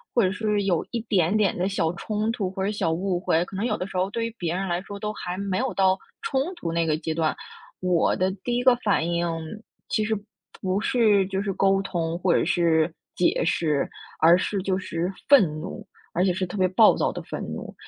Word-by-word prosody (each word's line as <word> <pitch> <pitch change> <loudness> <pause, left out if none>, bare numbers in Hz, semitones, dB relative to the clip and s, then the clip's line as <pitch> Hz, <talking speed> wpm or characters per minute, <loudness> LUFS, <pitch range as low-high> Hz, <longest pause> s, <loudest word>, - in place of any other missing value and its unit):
或 235 - +5
者 185 - +2
是 210 +1 0
有 180 -4 +1
一 235 - -2
点 195 -3 +2
点 205 -3 +2
的 180 +2 0
小 170 -4 0
冲 215 +4 -2
突 210 -5 -2
或 190 0 -4
者 200 - 0
小 200 -6 0
误 180 +2 -1
会， 170 -1 +1
可 195 - -10
能 195 - -2
有 220 -3 0
的 185 - -3
时 195 - -10
候 185 +1 +1
对 230 +2 -2
于 230 0 -6
别 175 -5 -2
人 190 +1 -2
来 175 0 -1
说 200 +1 -8
都 210 0 -3
还 180 -3 -5
没 195 -1 -1
有 260 0 0
到 190 -1 +4 0.3
冲 265 - 0
突 170 - -4
那 165 -1 +1
个 155 -1 +1
阶 160 0 -3
段。 155 -1 0 0.5
我 180 -2 +2
的 185 +1 +1
第 240 -1 0
1 245 - 0
个 255 -1 +6
反 205 -8 +1
应， 170 0 0 0.6
其 215 - +1
实 220 +1 0 0.5
不 190 0 0
是 215 -4 +3
就 195 0 -2
是 200 -1 -2
沟 195 +1 +3
通 170 -3 -2
或 185 -1 +2
者 - - +3
是 165 -2 +2 0.2
解 175 - +2
释， 155 -3 +1 0.3
而 170 +2 +7
是 195 +1 -1
就 185 0 0
是 180 -1 -3 0.2
愤 280 -6 +8 0.2
怒， - - -7 0.3
而 180 - +2
且 190 - +3
是 185 +1 -1
特 180 - -8
别 185 - +4
暴 200 +4 +5
躁 - - 0
的 - - -6
愤 - - -6
怒。 - - -6
190 Hz, 250 characters per minute, -25 LUFS, 175-210 Hz, 0.6 s, 愤